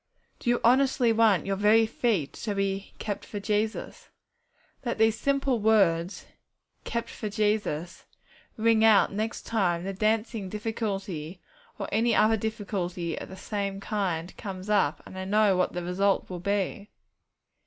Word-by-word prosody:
Do -, -, -2 dB
you 240 Hz, -, +3 dB
honestly 255 Hz, -1 st, +4 dB
want 220 Hz, -4 st, +3 dB
your 195 Hz, -, 0 dB
very 210 Hz, +3 st, +5 dB
feet 220 Hz, -, -1 dB
to 210 Hz, -3 st, -4 dB
be 195 Hz, 0 st, -2 dB
'kept 205 Hz, -2 st, -4 dB
for 205 Hz, -, -6 dB
Jesus'? 210 Hz, +2 st, -2 dB, 0.7 s
Let 235 Hz, -3 st, -2 dB
these 220 Hz, 0 st, +4 dB
simple 275 Hz, -3 st, +1 dB
words, 195 Hz, -5 st, +2 dB, 0.6 s
'Kept 235 Hz, 0 st, -2 dB
for 215 Hz, -2 st, -5 dB
Jesus,' 205 Hz, -6 st, -1 dB, 0.5 s
ring 225 Hz, 0 st, +3 dB
out 220 Hz, -2 st, +6 dB
next 220 Hz, +3 st, -3 dB
time 180 Hz, -6 st, 0 dB
the 195 Hz, +1 st, -3 dB
dancing 215 Hz, 0 st, 0 dB
difficulty 195 Hz, -6 st, -4 dB, 0.4 s
or -, -, -4 dB
any 230 Hz, +1 st, +2 dB
other 220 Hz, +1 st, +4 dB
difficulty 195 Hz, -6 st, -3 dB
of -, -, -7 dB
the 190 Hz, -, -9 dB
same 200 Hz, -1 st, -3 dB
kind 190 Hz, -5 st, -2 dB
comes 195 Hz, 0 st, -6 dB
up, 185 Hz, -7 st, +2 dB
and 185 Hz, -, -9 dB
I 190 Hz, -, -4 dB
know 205 Hz, 0 st, +3 dB
what 180 Hz, -, +1 dB
the 175 Hz, -, -3 dB
result 190 Hz, +2 st, 0 dB
will 180 Hz, -, -4 dB
be! 200 Hz, +2 st, -2 dB
205 Hz, 150 wpm, -27 LUFS, 190-220 Hz, 0.7 s, out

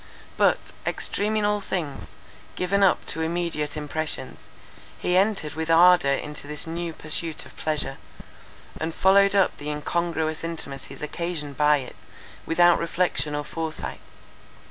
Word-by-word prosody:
But, -, -, +4 dB, 0.3 s
extreme 210 Hz, +2 st, -1 dB
in 215 Hz, -1 st, +2 dB
all 210 Hz, 0 st, +1 dB
things, 170 Hz, -7 st, -4 dB, 0.5 s
given 195 Hz, +2 st, +1 dB
up 195 Hz, -2 st, +4 dB
to 160 Hz, -, -2 dB
immediate 160 Hz, -3 st, -2 dB
impressions, 150 Hz, +1 st, -4 dB, 0.6 s
he 180 Hz, -, 0 dB
entered 190 Hz, -6 st, +2 dB
with 160 Hz, +1 st, -4 dB
ardour 175 Hz, -2 st, +6 dB
into 150 Hz, 0 st, -4 dB
this 150 Hz, 0 st, -4 dB
new 170 Hz, +1 st, -3 dB
pursuit 160 Hz, +1 st, -3 dB
of -, -, -15 dB
pleasure, 145 Hz, -3 st, -2 dB, 0.8 s
and 160 Hz, 0 st, -3 dB
followed 200 Hz, +1 st, +5 dB
up 195 Hz, -2 st, +3 dB
the 145 Hz, -, -5 dB
incongruous 160 Hz, +1 st, -1 dB
intimacies 150 Hz, -5 st, -5 dB
occasioned 150 Hz, -2 st, -4 dB
by 150 Hz, +1 st, +4 dB
it 130 Hz, -3 st, -8 dB, 0.5 s
without 175 Hz, +1 st, +5 dB
reflection 170 Hz, -3 st, 0 dB
or 145 Hz, -, -2 dB
foresight. 160 Hz, +1 st, -5 dB
165 Hz, 135 wpm, -25 LUFS, 150-180 Hz, 0.8 s, ardour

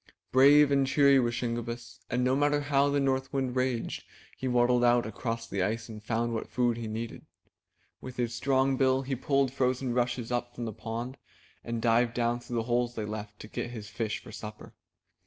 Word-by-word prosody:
Brave 140 Hz, +2 st, +7 dB
and 140 Hz, -1 st, +3 dB
cheery 140 Hz, 0 st, +5 dB
was 120 Hz, -1 st, 0 dB
Shingebiss, 120 Hz, 0 st, -4 dB
and 125 Hz, 0 st, 0 dB
no 130 Hz, +1 st, +3 dB
matter 145 Hz, +1 st, +2 dB
how 145 Hz, -1 st, +2 dB
the 140 Hz, 0 st, +1 dB
North 135 Hz, -1 st, 0 dB
Wind 130 Hz, -3 st, -1 dB
raged, 125 Hz, -2 st, -1 dB, 0.3 s
he 130 Hz, -, -4 dB
waddled 125 Hz, 0 st, +3 dB
out 120 Hz, -1 st, +4 dB
across 115 Hz, +1 st, -4 dB
the 100 Hz, -4 st, -3 dB
ice 115 Hz, +4 st, -1 dB
and 105 Hz, -1 st, -9 dB
found 115 Hz, +1 st, -1 dB
what 110 Hz, -, -4 dB
food 120 Hz, -2 st, +1 dB
he 115 Hz, -1 st, -4 dB
needed. 110 Hz, +1 st, -6 dB, 0.7 s
With 130 Hz, -1 st, -8 dB
his 120 Hz, -1 st, -1 dB
strong 130 Hz, +2 st, +2 dB
bill 130 Hz, 0 st, +3 dB
he 135 Hz, 0 st, -2 dB
pulled 135 Hz, 0 st, +1 dB
frozen 130 Hz, -1 st, 0 dB
rushes 120 Hz, -1 st, -1 dB
up 120 Hz, 0 st, -2 dB
from 120 Hz, -, -4 dB
the 110 Hz, -, -4 dB
pond, 120 Hz, +5 st, -5 dB, 0.5 s
and 115 Hz, -1 st, -4 dB
dived 115 Hz, 0 st, +3 dB
down 120 Hz, 0 st, +1 dB
through 120 Hz, 0 st, -7 dB
the 115 Hz, -, 0 dB
holes 120 Hz, +1 st, 0 dB
they 110 Hz, -, -3 dB
left, 105 Hz, 0 st, -6 dB
to -, -, -9 dB
get 120 Hz, -, -4 dB
his 110 Hz, -4 st, -8 dB
fish 110 Hz, -2 st, -3 dB
for -, -, -11 dB
supper. 105 Hz, 0 st, -9 dB
120 Hz, 200 wpm, -29 LUFS, 115-130 Hz, 0.7 s, Brave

